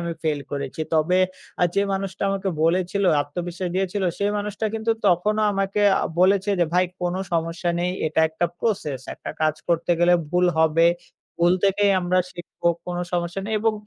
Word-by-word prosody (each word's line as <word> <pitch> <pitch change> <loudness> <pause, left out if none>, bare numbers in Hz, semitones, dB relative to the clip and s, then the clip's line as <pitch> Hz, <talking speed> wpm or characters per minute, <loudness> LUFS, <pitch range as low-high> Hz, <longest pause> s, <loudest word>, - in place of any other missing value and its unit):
আমি 170 0 -3
fail 150 -3 0
করেছি। 140 +1 -4
তবে, 160 +3 +3 0.5
আ - - +7
যে 200 - +3
মানুষটা 195 -1 -3
আমাকে 195 0 -2 0.2
বলেছিল, 185 +4 +1 0.2
আত্মবিশ্বাস 175 +4 -5
দিয়েছিল 190 +1 -1 0.2
সেই 200 0 +1
মানুষটা 210 +1 -3
কিন্তু 225 +1 -1 0.2
তখনও 210 +4 +2
আমাকে 195 +1 -1 0.2
আ - - 0 0.2
বলেছে 195 +2 +3
যে, - - +5
"ভাই, 180 +1 +4 0.2
কোন 175 0 -1 0.2
সমস্যা 165 +1 -1
নেই। 180 +1 0 0.2
এটা 155 +1 +1
একটা 160 +2 -1
process। 165 - -1
একটা - - -7
কাজ 155 -1 +2
করতে 170 0 +1
গেলে 175 +1 +5 0.2
ভুল 180 +1 +3
হবে। 160 +1 +4 0.5
ভুল 175 +1 +4
থেকেই 200 +1 +3
আমরা 180 +1 +1
শিখবো। 175 0 -3 0.2
কোন 175 0 -3
সমস্যা 175 +2 -2
নেই।" 220 - -3
এবং 225 +1 +2
180 Hz, 175 wpm, -23 LUFS, 170-195 Hz, 0.5 s, আ